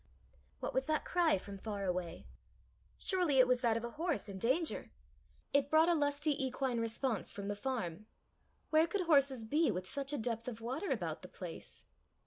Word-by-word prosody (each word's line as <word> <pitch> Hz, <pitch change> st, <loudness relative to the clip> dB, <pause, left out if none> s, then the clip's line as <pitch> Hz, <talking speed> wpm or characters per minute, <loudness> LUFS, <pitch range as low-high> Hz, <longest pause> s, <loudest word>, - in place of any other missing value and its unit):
What -, -, -2 dB
was 265 Hz, 0 st, 0 dB
that 310 Hz, -1 st, +1 dB
cry 345 Hz, -, +3 dB
from 195 Hz, +1 st, -8 dB
far 205 Hz, -1 st, -3 dB
away? 180 Hz, -2 st, -3 dB, 0.7 s
Surely 355 Hz, -7 st, +2 dB
it 255 Hz, -, +8 dB
was 250 Hz, -1 st, +3 dB
that 230 Hz, -3 st, +3 dB
of 230 Hz, -, -4 dB
a 235 Hz, -, -4 dB
horse 335 Hz, -9 st, 0 dB
in 195 Hz, -1 st, -6 dB
danger! 265 Hz, -, 0 dB, 0.6 s
It 280 Hz, 0 st, +3 dB
brought 315 Hz, +2 st, +5 dB
a -, -, +5 dB
lusty 290 Hz, -1 st, +1 dB
equine 260 Hz, -2 st, -1 dB
response 230 Hz, +1 st, -1 dB
from 200 Hz, 0 st, -5 dB
the 205 Hz, -, -1 dB
farm. 215 Hz, -5 st, -3 dB, 0.6 s
Where 315 Hz, +1 st, +5 dB
could 385 Hz, +4 st, -1 dB
horses 280 Hz, -7 st, +3 dB
be 305 Hz, +8 st, +3 dB
with 180 Hz, +1 st, -2 dB
such 280 Hz, +4 st, -3 dB
a 295 Hz, -, -1 dB
depth 230 Hz, -1 st, -3 dB
of 235 Hz, -3 st, -4 dB
water 260 Hz, -, -3 dB
about -, -, -2 dB
the -, -, -9 dB
place? -, -, -7 dB
260 Hz, 185 wpm, -35 LUFS, 220-305 Hz, 0.7 s, it